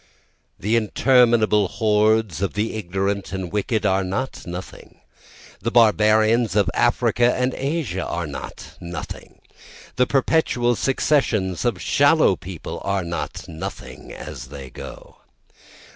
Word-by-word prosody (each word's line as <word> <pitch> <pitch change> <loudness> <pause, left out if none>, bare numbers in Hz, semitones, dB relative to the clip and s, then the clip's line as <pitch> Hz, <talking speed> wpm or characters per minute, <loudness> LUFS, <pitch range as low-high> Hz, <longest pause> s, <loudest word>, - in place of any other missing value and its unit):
The 110 +5 0
interminable 115 -2 +3
hordes 105 -3 +1
of 100 - -1
the 105 +2 -1
ignorant 100 0 -2
and 95 -3 -4
wicked 105 +2 -1
are 95 0 +2
not 95 +7 -4
nothing, 90 +2 -9 0.6
The 115 - -2
barbarians 110 0 +4
of 100 -3 +2
Africa 120 0 +2
and 125 0 0
Asia 135 - -2
are 85 0 -3
not 75 - -9
nothing, 85 0 -8 0.6
The 125 - +3
perpetual 130 -4 +2
successions 115 - 0
of 115 -7 0
shallow 145 - +4
people 90 -1 -8
are 100 -1 -1
not 85 -1 -5
nothing 80 -1 -8
as 65 - -8
they 70 -2 -10
go. - - -11
105 Hz, 120 wpm, -22 LUFS, 95-120 Hz, 0.6 s, barbarians